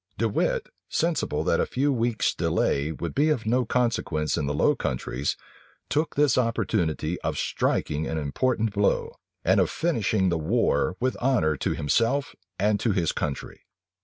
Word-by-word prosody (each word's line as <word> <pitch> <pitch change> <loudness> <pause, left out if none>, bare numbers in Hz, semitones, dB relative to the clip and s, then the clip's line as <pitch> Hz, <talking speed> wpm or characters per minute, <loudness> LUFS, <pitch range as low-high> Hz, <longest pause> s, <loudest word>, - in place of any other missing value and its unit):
De - - +1
Wit, - - 0 0.2
sensible 170 0 0
that - - +2
a - - +2
few 140 +2 +1
weeks' 120 -2 +1
delay 70 +3 0
would 85 +1 -5
be 150 +3 +2
of 130 -8 0
no 125 +3 +2
consequence 110 - 0
in 70 - -1
the 75 - -1
Low - - +3
Countries, 65 +2 -2 0.5
took 155 +3 0
this 145 -3 +3
opportunity 90 -8 -1
of - - -2
striking 75 +1 -1
an 80 - -2
important 110 - 0
blow, 100 0 +1 0.3
and - - +4
of - - +3
finishing 110 - +1
the 85 -2 0
war 90 -2 +1
with 130 +1 0
honor 115 - +2
to - - -1
himself 115 - +1 0.2
and 105 +1 +2
to 115 - +1
his 85 -4 +1
country. 70 -2 -4
110 Hz, 160 wpm, -26 LUFS, 80-130 Hz, 0.5 s, and